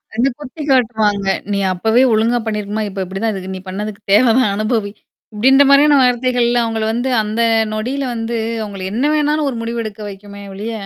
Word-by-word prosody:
என்ன 240 +4 +2
குத்தி 295 +2 -9
காட்டுவாங்க. 220 -6 +1 0.3
நீ 200 - 0
அப்பவே 220 +7 +2
ஒழுங்கா 225 +3 +2
பண்ணியிருக்கணுமா? 210 0 -3
இப்ப 195 0 -5
இப்படித்தான் 195 +4 -3
இதுக்கு. 190 -1 -6
நீ 185 - -6
பண்ணதுக்கு 205 +2 -5
தேவைதான் 225 0 +4
அனுபவி. 215 -1 -1 0.4
இப்படீன்ற 265 +6 +5
மாதிரியான 285 +1 +6
வார்த்தைகள்ல 245 -1 +2
அவங்கள 225 -1 -2
வந்து 245 +3 -2
அந்த 215 +2 -2 0.3
நொடியில 255 +6 -3
வந்து, 230 0 -3 0.2
அவங்கள 200 -3 -6
என்ன 245 +6 -1
வேணாலும் 300 0 +1
ஒரு 240 - -5
முடிவு 230 0 -3
எடுக்க 215 -1 -8
வைக்குமே 200 +1 -11
ஒழிய, 210 +4 -5
225 Hz, 165 wpm, -17 LUFS, 205-250 Hz, 0.4 s, மாதிரியான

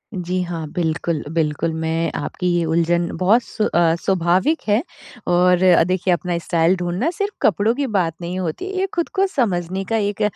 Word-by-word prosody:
जी 180 0 -2
हाँ, 165 -3 -5
बिल्कुल, 165 -1 -1
बिल्कुल। 160 0 0
मैं 165 +1 -1
आपकी 180 - -3
ये 170 - +1
उलझन 170 +1 +1
बहुत 210 +7 +4
स्व 215 - -2
अ, 170 -1 +2
स्वाभाविक 190 - +1
है 210 +3 +3 0.5
और 180 +1 +3
अ, 180 -3 +6
देखिए 185 0 +1
अपना 175 0 -2
स्टाइल 170 +1 +1
ढूँढना 180 - -1
सिर्फ़ 405 +3 -3
कपड़ों 210 +3 +2
की 280 0 -1
बात 165 -3 +1
नहीं 175 +2 -4
होती 180 - -3
ये 385 - +1
खुद 340 - -1
को 385 - +2
समझने 190 - -1
का 225 - +1
एक 205 -1 -2
180 Hz, 180 wpm, -20 LUFS, 170-205 Hz, 0.5 s, अ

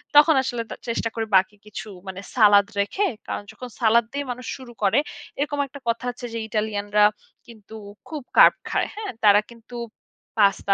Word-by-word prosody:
তখন 300 +2 +7
আসলে 245 -3 -2
তা - - -5
চেষ্টা 230 0 -1
করি 225 -1 -1
বাকি 190 +2 +1
কিছু 210 +1 -8 0.2
মানে 190 0 -6 0.2
সালাদ 205 -4 +6 0.2
রেখে, 390 - 0 0.2
কারণ - - -4
যখন 250 - -9
সালাদ 230 0 +4
দিয়ে 285 0 -3
মানুষ 250 +1 -7
শুরু 260 -3 -11
করে 210 +7 +4 0.4
এরকম 290 0 -1
একটা 285 +2 -11
কথা 230 +2 -1
আছে, 245 0 -9
যে 230 - -3
ইটালিয়ানরা 210 -1 0 0.4
কিন্তু 220 -2 -13 0.3
খুব 310 -2 -5 0.2
কার্ব - - +8
খায়। - - 0
হ্যাঁ? 425 -1 -5
তারা 205 -1 +7
কিন্তু 235 +1 -13 0.6
পাস্তা, 200 -1 +3
230 Hz, 175 wpm, -23 LUFS, 210-255 Hz, 0.6 s, কার্ব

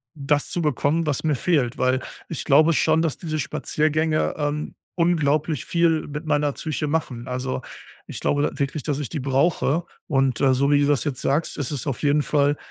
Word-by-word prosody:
das 145 0 0
zu 175 - -2
bekommen, 150 +2 +1
was 145 0 -1
mir 155 -3 +2
fehlt. 135 -5 +1
Weil, 130 +1 +1 0.3
ich 160 - -4
glaube 155 +4 +5
schon, 160 +1 +3
dass 165 -4 -1
diese 155 -3 -3
Spaziergänge, 155 +3 0
ähm, 150 0 -2 0.2
unglaublich 155 -4 +1
viel 170 -2 +1
mit 150 +2 -6
meiner 150 -1 +1
Psyche 150 +1 -3
machen. 130 -6 -2
Also, 130 +1 -3 0.4
ich - - -7
glaube 145 0 +1
wirklich, 140 +1 -2
dass 145 -2 -1
ich 145 - -3
die 150 -5 -4
brauche. 145 +4 +1 0.2
Und, 135 -4 +1
äh, 135 -1 +4
so 140 +2 +2
wie 145 0 +4
du 145 - +3
das 145 -2 +1
jetzt 135 -4 -3
sagst, 145 +4 0
ist 145 0 -3
es 145 0 -4
auf 135 0 -3
jeden 145 +1 +3
Fall 145 0 +1
145 Hz, 195 wpm, -23 LUFS, 140-155 Hz, 0.4 s, glaube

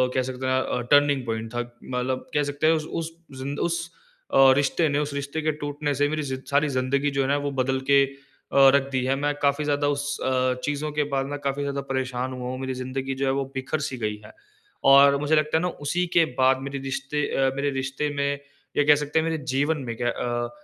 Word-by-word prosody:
कह 130 - +3
सकते 130 0 -4
हैं 130 0 +2
अ, 125 - -2
टर्निंग 145 -2 +4
पॉइंट 115 0 -4
था 120 - -2 0.2
मतलब 130 +1 -3
कह 150 0 +2
सकते 145 +2 -1
हैं 165 - +6
उस 155 -1 -1 0.2
उस 165 0 -5 0.3
जिंद 140 +2 -4
उस 170 0 -1 0.5
अ, 135 -1 +7
रिश्ते 145 +3 +2
ने 145 +1 +1
उस 145 -1 -2
रिश्ते 140 +2 -3
के 155 0 +1
टूटने 145 0 -2
से 145 - +5
मेरी 155 0 -1
ज़ि 130 - -2
सारी 145 +2 +3
ज़िंदगी 140 +2 0
जो 135 0 0
है 135 - 0
ना 140 +1 +2
वो 140 - -2
बदल 130 +1 0
के 140 0 +7
अ, 135 0 +2
रख 140 0 +1
दी 130 -1 0
है। 135 +1 +2
मैं 145 +1 0
काफ़ी 140 +1 +2
ज़्यादा 145 0 +1
उस 145 0 -1
अ, 130 -1 +2
चीज़ों 145 +1 -2
के 150 0 0
बाद 135 0 +1
में 145 +1 -5
काफ़ी 140 0 -2
ज़्यादा 140 0 -2
परेशान 130 0 -2
हुआ 125 0 -5
हूँ। 130 0 -4
मेरी 130 0 -3
ज़िंदगी 130 +1 -4
जो - - +1
है 140 - 0
बिखर 135 +3 -2
सी 130 - -6
गई 105 -2 -2
है 105 - -13 0.6
और 140 0 +8
मुझे 150 +2 +2
लगता 155 +1 +2
है - - 0
ना 180 - 0 0.2
उसी 180 +5 +1
के 165 - +7 0.2
बाद 130 0 +5
मेरे 140 0 -4
रिश्ते 135 +2 -3
अ, 135 -1 +2
मेरे 140 +1 0
रिश्ते 135 +2 -2
में 140 0 0 0.4
या 145 - +5
कह 150 0 +7
सकते 150 +2 0
हैं 160 - 0
मेरे 165 -1 -1 0.2
जीवन 145 +4 +1
में 115 - -3
क्या 120 0 0
अ, 120 0 -2
140 Hz, 240 wpm, -25 LUFS, 130-145 Hz, 0.6 s, और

